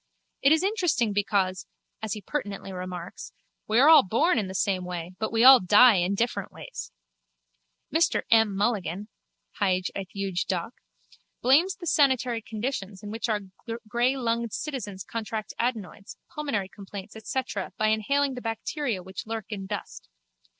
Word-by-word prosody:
It 275 - +5
is 320 +2 +4
interesting 345 - +1
because, 190 -3 0 0.3
as 220 -1 -2
he 210 -2 -7
pertinently 200 -7 -4
remarks, 180 -1 -7 0.3
we 220 - +1
are 280 - +7
all 320 0 +9
born 235 - +2
in 200 - -2
the 190 - -7
same 190 -1 0
way 175 -1 -5
but 220 - -2
we 225 +1 +2
all 260 0 +10
die 210 +4 +6
in 180 +3 +1
different 235 +4 -1
ways. - - -8 1.0
Mr 330 +2 +2
M. 225 -3 +5
Mulligan 205 -1 -1 0.5
(Hyg. 185 -2 +1
et 195 -1 -5
Eug. 195 -3 -1
Doc.) 185 +5 -2 0.7
blames 315 +10 +4
the 355 - -9
sanitary 260 -6 +2
conditions 215 -4 -5
in 205 - -6
which 225 +1 -3
our 210 -2 0 0.5
greylunged 235 -1 0
citizens 210 - -5
contract 220 -1 -5
adenoids, 220 -5 -3 0.2
pulmonary 280 -11 -2
complaints 200 +1 -10
etc. 220 -2 -3
by 215 0 +2
inhaling 275 +6 +1
the 250 - -6
bacteria 225 - -3
which 190 +3 -8
lurk 225 -1 -4
in 195 -2 -5
dust. 205 - -7
215 Hz, 150 wpm, -27 LUFS, 195-250 Hz, 1.0 s, all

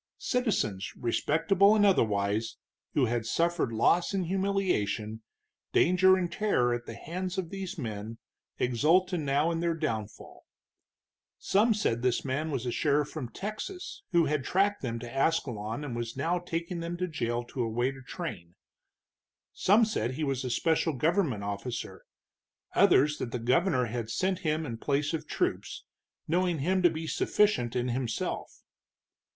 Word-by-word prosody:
Citizens, 200 - -1
respectable 165 - +3
and 205 -1 +4
otherwise, 110 - +1 0.4
who 140 - +4
had 120 0 -1
suffered 170 +2 0
loss 170 - +2
and 190 -2 0
humiliation, 180 - -1 0.5
danger 185 +2 +5
and 175 -2 -2
terror 150 -12 +1
at 120 0 -4
the 115 - -6
hands 180 +8 -5
of 180 -3 -3
these 195 -1 -5
men, 110 -4 -5 0.4
exulted 165 - +2
now 145 +2 +1
in 165 - -1
their 170 -1 0
downfall. 110 -10 -5 0.9
Some 215 +3 +3
said 120 - 0
this 125 +1 0
man 140 +4 -1
was 135 -4 -2
a 120 - -1
sheriff 145 +2 +1
from 135 -7 -5
Texas, 215 - -6
who 170 -2 +4
had 150 -1 0
tracked 200 +8 +1
them 115 -3 -3
to 120 +2 -8
Ascalon 125 -5 0
and 130 -5 -4
was 120 +1 -4
now 170 +5 0
taking 170 0 -4
them 170 +1 -4
to 180 +1 -1
jail 120 -7 -2
to 125 +1 -5
await 120 +3 0
a 135 - -11
train; 125 - -7 1.0
some 215 +4 +4
said 130 - -2
he 155 - -3
was 135 -3 -1
a 130 - -3
special 160 +5 +1
government 150 - +1
officer, 105 +4 -5 0.7
others 150 +1 +4
that 115 - -4
the 125 - -2
governor 125 +3 +2
had 115 -1 -4
sent 185 +8 0
him 155 -1 -1
in 115 -4 -5
place 145 +4 0
of 160 - -3
troops, - - -2 0.4
knowing 175 +1 +1
him 185 +6 +1
to 175 - +6
be 160 0 -5
sufficient 195 - +1
in 125 0 0
himself. 120 -2 -3
150 Hz, 155 wpm, -29 LUFS, 120-180 Hz, 1.0 s, to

